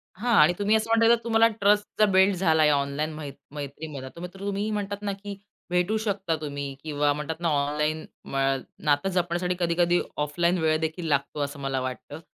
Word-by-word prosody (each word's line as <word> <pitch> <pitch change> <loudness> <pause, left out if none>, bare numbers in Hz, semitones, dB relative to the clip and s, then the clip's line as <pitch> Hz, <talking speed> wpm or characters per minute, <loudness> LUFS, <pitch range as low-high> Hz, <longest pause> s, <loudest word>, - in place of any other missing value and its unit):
हां 235 +5 0
आणि 155 +4 +5
तुम्ही 205 +2 +3
असं 220 +1 0
म्हणताय 230 0 +4
तर 235 - +7
तुम्हाला 225 0 +4
ट्रस्ट 205 +1 +4
जर 215 - +7
बिल्ड 190 +1 +5
झालाय 160 -4 +3
ऑनलाईन 145 +2 0
मैत् 150 -2 -7 0.2
मैत्रीमधला, 145 -1 -6
तर 170 - -14
मग 180 - -4
तर 195 - -13
तुम्ही 200 +1 -2
म्हणतात 205 -1 -3
ना 205 -1 -2
की 200 0 -8 0.3
भेटू 180 +5 +1
शकता 200 -6 -1
तुम्ही 140 -2 -4
किंवा 145 -2 +1
म्हणतात 150 +2 -5
ना 170 - +1
ऑनलाईन 150 +2 0 0.2
म - - -7 0.5
नातं 145 +5 +2
जपण्यासाठी 180 0 0
कधी-कधी 175 0 +2 0.2
ऑफलाईन 170 +5 +1
वेळ 155 -1 +3
देखील 160 +2 -3
लागतो 145 0 0
असं 145 0 -3
मला 135 -1 -2
वाटतं. 130 +3 -6
170 Hz, 190 wpm, -26 LUFS, 150-200 Hz, 0.5 s, तर